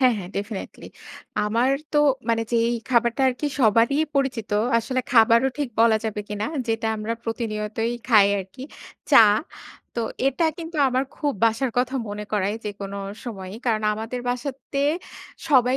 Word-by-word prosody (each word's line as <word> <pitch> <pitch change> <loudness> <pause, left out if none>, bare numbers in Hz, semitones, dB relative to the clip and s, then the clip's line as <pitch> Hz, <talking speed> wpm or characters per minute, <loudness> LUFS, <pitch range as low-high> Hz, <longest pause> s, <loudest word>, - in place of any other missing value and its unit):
হ্যাঁ, 255 -2 +5
হ্যাঁ 180 -2 -7
ডেফিনিটলি। 200 0 -6 0.6
আমার 235 +5 +2 0.2
তো 300 - +3 0.3
মানে 230 0 +2
যেই 230 0 +3 0.2
খাবারটা 235 +1 +2
আরকি 255 +4 -2
সবারই 230 +3 +4 0.2
পরিচিত, 265 -6 -1 0.3
আসলে 255 +3 -1
খাবারও 230 +2 +5
ঠিক 285 -4 -1
বলা 230 -1 +5
যাবে 215 -1 -2
কিনা, 210 0 -3 0.2
যেটা 225 0 0
আমরা 215 +1 -3
প্রতিনিয়তই 225 0 -2 0.2
খাই 215 -5 +7
আরকি, 195 +7 -8 0.5
চা। 285 - +8 0.8
তো 235 - -1 0.3
এটা 275 +5 +1
কিন্তু 330 -1 -7
আমার 260 +1 0
খুব 290 -2 0
বাসার 230 +3 +1
কথা 255 +2 0
মনে 205 +1 -5
করায় 205 0 0
যেকোনো 200 -1 -5 0.3
সময়ই। 195 -4 -7
কারণ 220 -2 +1
আমাদের 225 +3 -5
বাসাতে 265 +2 -3 0.7
সবাই 255 -3 +4
230 Hz, 145 wpm, -23 LUFS, 215-255 Hz, 0.8 s, চা